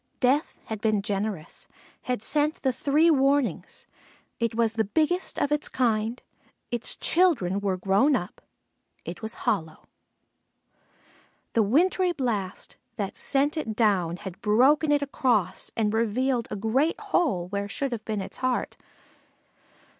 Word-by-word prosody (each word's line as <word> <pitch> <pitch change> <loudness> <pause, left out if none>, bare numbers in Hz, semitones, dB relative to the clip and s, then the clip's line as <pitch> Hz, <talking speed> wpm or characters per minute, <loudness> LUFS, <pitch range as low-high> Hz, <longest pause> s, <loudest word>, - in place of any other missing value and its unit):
Death 270 +4 +1
had 220 -2 -5
been 215 -3 +1
generous 200 -5 -4 0.3
had 250 -4 -2
sent 300 +3 0
the 265 -2 +2
three 295 +6 +3
warnings: 275 -2 +1 0.5
it 230 -1 -1
was 230 -1 +2
the 225 -1 +1
biggest 320 - 0
of 290 - 0
its 295 0 0
kind, 230 -1 0 0.5
its 240 -1 -3
children 270 - +2
were 195 -2 -1
grown 200 +10 +3
up, 180 -4 -5 0.6
it 170 +4 -7
was 220 +1 -5
hollow. 160 -6 -1 1.7
The 230 - +4
wintry 350 - +2
blast 215 - -3 0.2
that 200 -2 -4
sent 285 +3 0
it 225 -8 -3
down 190 -7 +2
had 190 -1 -9
broken 270 +8 +4
it 290 -1 +3
across 240 -9 0
and 215 -2 +1
revealed 235 +2 0
a - - -4
great 245 - +1
hole 335 - 0
where 200 +1 -3
should 275 +5 -2
have 230 -3 -4
been 215 -2 -3
its - - -8
heart. 255 -1 -1
230 Hz, 140 wpm, -26 LUFS, 205-285 Hz, 1.7 s, The